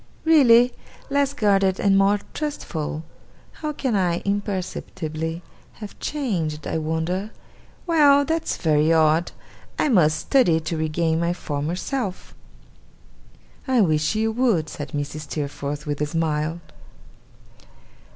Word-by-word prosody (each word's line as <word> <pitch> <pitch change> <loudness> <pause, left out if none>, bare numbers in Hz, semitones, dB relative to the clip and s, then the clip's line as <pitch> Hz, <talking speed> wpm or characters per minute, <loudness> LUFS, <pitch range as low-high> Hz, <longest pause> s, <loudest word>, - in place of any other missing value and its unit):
Really? 250 -6 +6 0.4
Less 280 0 +1
guarded 195 -4 +2
and 200 -1 +3
more 200 +1 +3
trustful? 160 - -4 0.5
How 305 -1 -5
can 265 -6 -2
I, 175 -3 +1
imperceptibly, 180 -5 -3 0.3
have 210 -2 -10
changed, 175 - -2
I 160 - -2
wonder! 160 +6 -2 0.6
Well, 290 -4 +5
that's 325 +1 -1
very 155 -1 +2
odd! 160 +1 +3 0.5
I - - +1
must 155 - +4
study 180 - +3
to 160 +1 -4
regain 160 +1 0
my 170 +1 0
former 150 0 -3
self.' 200 -1 -4 1.3
'I 255 -3 +3
wish 155 0 +1
you 220 +1 +1
would,' 220 -10 +1
said 145 -3 -7
Mrs. 145 +1 -4
Steerforth, 145 0 -4
with 145 -1 -3
a 150 - +1
smile. 160 +1 -1
175 Hz, 120 wpm, -23 LUFS, 155-230 Hz, 1.3 s, Really